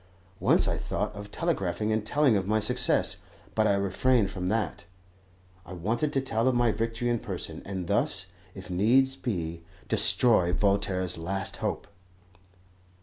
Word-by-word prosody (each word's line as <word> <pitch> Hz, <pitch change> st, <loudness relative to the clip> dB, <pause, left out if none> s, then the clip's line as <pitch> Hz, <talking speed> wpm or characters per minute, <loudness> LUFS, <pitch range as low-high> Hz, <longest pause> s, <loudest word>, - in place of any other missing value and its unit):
Once -, -, +3 dB
I -, -, 0 dB
thought -, -, -3 dB
of 105 Hz, 0 st, -8 dB
telegraphing 105 Hz, -, -1 dB
and 110 Hz, -1 st, 0 dB
telling 140 Hz, +1 st, +3 dB
of 95 Hz, -1 st, 0 dB
my 110 Hz, +1 st, +2 dB
success, 125 Hz, +3 st, +1 dB, 0.4 s
but 110 Hz, 0 st, +2 dB
I 100 Hz, -, +3 dB
refrained 100 Hz, +3 st, +2 dB
from 90 Hz, -2 st, -4 dB
that. 105 Hz, -3 st, -1 dB, 0.8 s
I 95 Hz, -, -10 dB
wanted 115 Hz, -, -1 dB
to 135 Hz, -, +2 dB
tell 115 Hz, -2 st, 0 dB
of 130 Hz, -, +3 dB
my 120 Hz, -1 st, +3 dB
victory 115 Hz, +2 st, -2 dB
in 120 Hz, -1 st, +1 dB
person, -, -, -6 dB
and 95 Hz, -2 st, -4 dB
thus, 90 Hz, -, 0 dB, 0.3 s
if 95 Hz, -1 st, -9 dB
needs 125 Hz, +9 st, +3 dB
be, 85 Hz, -10 st, -3 dB, 0.3 s
destroy 100 Hz, -8 st, +3 dB
Voltaire's 95 Hz, -3 st, +1 dB
last 95 Hz, +3 st, -3 dB
hope. -, -, -3 dB
105 Hz, 150 wpm, -28 LUFS, 95-120 Hz, 0.8 s, Once